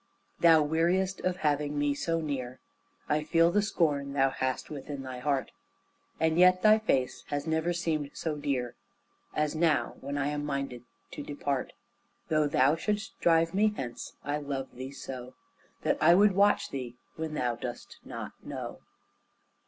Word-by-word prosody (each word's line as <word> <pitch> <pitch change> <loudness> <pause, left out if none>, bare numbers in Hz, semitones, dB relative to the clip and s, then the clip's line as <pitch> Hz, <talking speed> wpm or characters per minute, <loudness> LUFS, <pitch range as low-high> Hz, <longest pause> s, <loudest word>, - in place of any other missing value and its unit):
Thou 165 -2 +6
weariest 175 +5 +1
of 185 0 0
having 145 0 +1
me 145 0 +2
so 165 +3 -1
near, 130 -5 -4 0.5
I 150 0 +1
feel 165 +2 +4
the 205 +3 +3
scorn 145 -9 0
thou 135 -1 +3
hast 130 +2 -2
within 140 -1 -6
thy 130 -1 -6
heart, 140 0 -1 0.7
And 160 +1 +2
yet 185 0 +6
thy 215 0 +7
face 130 -12 0
has 145 -1 -2
never 160 +1 0
seemed 160 -4 -1
so 160 -2 -2
dear 135 -4 -2 0.6
As 150 -1 +1
now, 160 -2 +1
when 140 +1 -4
I 145 0 0
am 145 0 -2
minded 140 -4 -3 0.3
to - - -6
depart. 140 -2 -3 0.6
Though 155 -1 +3
thou 140 +1 +4
shouldst 205 +4 -3
drive 165 -1 +3
me 210 +2 +2
hence, 120 -2 -6
I 145 +1 -1
love 140 -2 -4
thee 130 +2 -6
so 130 -2 -8 0.5
That - - +1
I 170 +2 +7
would 205 +2 +6
watch 200 +2 +3
thee 125 -3 -5 0.2
when 160 -1 -4
thou 120 -4 0
dost 120 0 -7
not - - -6
know. - - -6
150 Hz, 160 wpm, -29 LUFS, 135-165 Hz, 0.7 s, thy